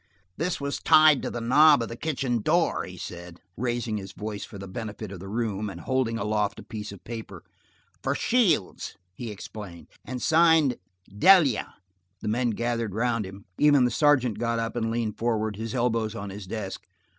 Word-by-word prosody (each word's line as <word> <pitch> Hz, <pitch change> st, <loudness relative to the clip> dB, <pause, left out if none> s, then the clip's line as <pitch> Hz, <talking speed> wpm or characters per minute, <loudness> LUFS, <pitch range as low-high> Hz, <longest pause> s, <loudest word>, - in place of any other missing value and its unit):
"This 170 Hz, +3 st, -2 dB
was 140 Hz, 0 st, -3 dB
tied 155 Hz, -3 st, +6 dB
to -, -, -3 dB
the 120 Hz, -, -4 dB
knob 145 Hz, +3 st, +6 dB
of -, -, -4 dB
the 115 Hz, -, -7 dB
kitchen 130 Hz, -4 st, -1 dB
door," 165 Hz, +7 st, +1 dB
he 95 Hz, -1 st, -10 dB
said, 85 Hz, 0 st, -8 dB, 0.2 s
raising 120 Hz, -2 st, -2 dB
his 95 Hz, -1 st, -7 dB
voice 105 Hz, 0 st, -5 dB
for 100 Hz, -, -9 dB
the 95 Hz, 0 st, -8 dB
benefit 105 Hz, 0 st, -6 dB
of 95 Hz, -, -7 dB
the 95 Hz, -, -9 dB
room, 105 Hz, -2 st, -2 dB
and 90 Hz, -3 st, -8 dB
holding 130 Hz, -3 st, 0 dB
aloft 105 Hz, -2 st, -1 dB
a -, -, -9 dB
piece 105 Hz, -2 st, -7 dB
of 100 Hz, -, -12 dB
paper. 115 Hz, -1 st, -8 dB, 0.6 s
"For -, -, 0 dB
Shields!" 200 Hz, -, +1 dB, 0.2 s
he 115 Hz, +4 st, -6 dB
explained, 100 Hz, -3 st, -9 dB
"and 125 Hz, 0 st, -5 dB
signed 160 Hz, -3 st, +4 dB, 0.4 s
'Delia.'" 150 Hz, -, +5 dB, 0.4 s
The -, -, -6 dB
men 120 Hz, +2 st, +1 dB
gathered 115 Hz, -2 st, -2 dB
around 115 Hz, -3 st, 0 dB
him, 100 Hz, +1 st, -11 dB
even 145 Hz, -3 st, +5 dB
the 125 Hz, -, +1 dB
sergeant 130 Hz, -5 st, +3 dB
got 115 Hz, 0 st, 0 dB
up 115 Hz, +1 st, -2 dB
and 115 Hz, -2 st, -1 dB
leaned 115 Hz, -2 st, -2 dB
forward, 110 Hz, -2 st, 0 dB
his 110 Hz, +3 st, -5 dB
elbows 115 Hz, -3 st, 0 dB
on 100 Hz, -2 st, -5 dB
his 100 Hz, -1 st, -8 dB
desk. 100 Hz, -1 st, -5 dB
115 Hz, 185 wpm, -26 LUFS, 105-125 Hz, 0.6 s, tied